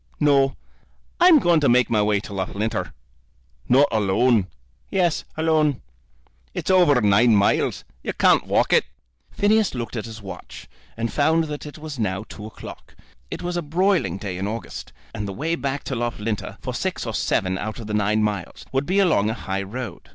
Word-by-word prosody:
"No; 140 -2 +3 0.6
I'm 350 -2 +8
going 175 - +4
to 145 - +2
make 125 +1 +4
my 110 -2 +2
way 105 -1 +2
to 105 - -9
Loughlinter." 100 +3 -2 0.8
"Not 135 +3 +6
alone?" 110 0 +2 0.4
"Yes, 175 -4 +1
alone." 155 -4 +1 0.7
"It's - - -1
over 175 -8 +5
nine 105 +3 +5
miles. 100 0 +2 0.2
You - - -3
can't - - +3
walk - - +2
it." - - +4 0.4
Phineas 210 -4 +2
looked 120 -1 -5
at 110 - -3
his 110 -1 -9
watch, 100 -3 -10 0.3
and 115 0 -2
found 160 +3 +3
that 150 -1 -6
it 145 - -10
was 155 -4 -7
now 95 -2 -1
two 105 0 -9
o'clock. 110 - -11 0.3
It - - -6
was 175 0 -3
a 175 - 0
broiling 165 - +1
day 95 -3 -5
in 95 - -2
August, 110 +2 -6 0.2
and 105 - -4
the 100 - -5
way 160 +9 -2
back 140 -3 -2
to 135 - -4
Loughlinter, 115 -3 -3
for - - -4
six - - -3
or - - -4
seven 95 0 0
out 110 +1 -4
of 115 - -7
the 105 - -5
nine 105 +1 +2
miles, 105 -4 -3
would 135 +1 -1
be 185 +3 +1
along 165 - +3
a 110 - -2
high 95 -3 -3
road. 105 0 -7
120 Hz, 185 wpm, -23 LUFS, 105-155 Hz, 0.8 s, I'm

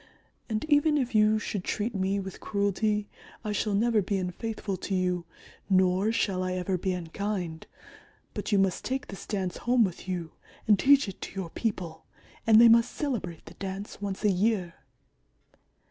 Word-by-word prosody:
And 220 +3 -1
even 300 0 +4
if 255 -4 -1
you 215 0 +5
should 205 -2 -3
treat 220 +5 -2
me 195 0 0
with 190 -1 -7
cruelty 205 +1 0 0.4
I 210 - -1
shall 210 0 0
never 225 +1 +3
be 200 +1 -1
unfaithful 195 +2 -3
to 195 - -3
you, 180 -2 0 0.4
nor 190 +2 +3
shall 195 -5 0
I 185 0 -1
ever 185 +1 -1
be 185 +1 -1
unkind. 180 -1 -4 0.7
But - - -4
you 205 - +4
must 195 -2 +1
take 265 +2 -3
this 195 - -8
Dance 190 -4 -2
home 245 -1 +3
with 185 -2 -3
you 175 -3 -3 0.4
and 210 -2 +5
teach 280 -2 +5
it 195 - -8
to - - -6
your 185 -4 -4
people 180 -8 -3 0.4
and 220 -1 +8
they 235 - +9
must 230 +1 +5
celebrate 220 - -3
the - - -11
Dance 195 +1 -6
once 200 0 -4
a 210 - +4
year." 190 -2 +1
200 Hz, 175 wpm, -28 LUFS, 185-220 Hz, 0.7 s, they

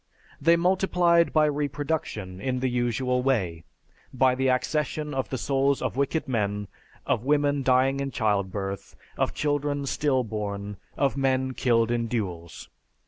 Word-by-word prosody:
They 165 +4 +5
multiplied 175 -1 +3
by 155 -1 +4
reproduction 145 - -3
in 130 +2 -1
the 130 0 0
usual 125 +1 0
way, 95 - 0 0.5
by 130 0 +3
the 130 +1 0
accession 150 +3 -1
of 135 -1 -2
the 130 - -2
souls 135 +1 +1
of - - -3
wicked 140 +3 0
men, 105 -4 -1 0.4
of 110 - 0
women 145 0 +2
dying 130 +1 +3
in 140 0 -2
childbirth, 100 -4 -2 0.2
of - - -1
children 145 -1 -1
still 135 -2 +1
born, 105 -2 -5 0.2
of 140 0 +1
men 130 -1 +1
killed 115 -2 +2
in 120 -1 0
duels. 90 -8 -4
130 Hz, 140 wpm, -26 LUFS, 110-145 Hz, 0.5 s, They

